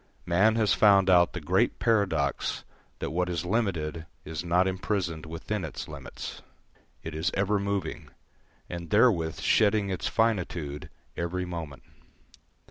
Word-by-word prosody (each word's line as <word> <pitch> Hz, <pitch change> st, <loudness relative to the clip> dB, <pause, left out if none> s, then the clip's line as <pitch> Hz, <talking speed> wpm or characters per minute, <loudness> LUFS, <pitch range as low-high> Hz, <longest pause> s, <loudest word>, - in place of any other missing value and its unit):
Man 95 Hz, +6 st, +3 dB
has 110 Hz, -3 st, +3 dB
found 100 Hz, -3 st, +5 dB
out 90 Hz, -1 st, +5 dB
the -, -, -4 dB
great -, -, +1 dB
paradox 100 Hz, -11 st, 0 dB, 0.3 s
that -, -, -4 dB
what 90 Hz, +2 st, 0 dB
is 85 Hz, -1 st, -2 dB
limited 85 Hz, -6 st, -1 dB, 0.2 s
is 80 Hz, +1 st, -5 dB
not 90 Hz, +2 st, +2 dB
imprisoned 95 Hz, -4 st, -2 dB
within 85 Hz, +5 st, -4 dB
its 80 Hz, -, -6 dB
limits; -, -, -8 dB, 0.6 s
it 80 Hz, -, -6 dB
is 80 Hz, +4 st, 0 dB
ever 100 Hz, +1 st, +1 dB
moving, 100 Hz, -4 st, -3 dB, 0.6 s
and 85 Hz, -1 st, -6 dB
therewith 100 Hz, -7 st, +3 dB
shedding 105 Hz, -2 st, +3 dB
its 95 Hz, -, -2 dB
finitude 90 Hz, -10 st, -1 dB, 0.3 s
every 90 Hz, +2 st, -2 dB
moment. 80 Hz, -5 st, -7 dB
90 Hz, 130 wpm, -28 LUFS, 80-100 Hz, 0.6 s, found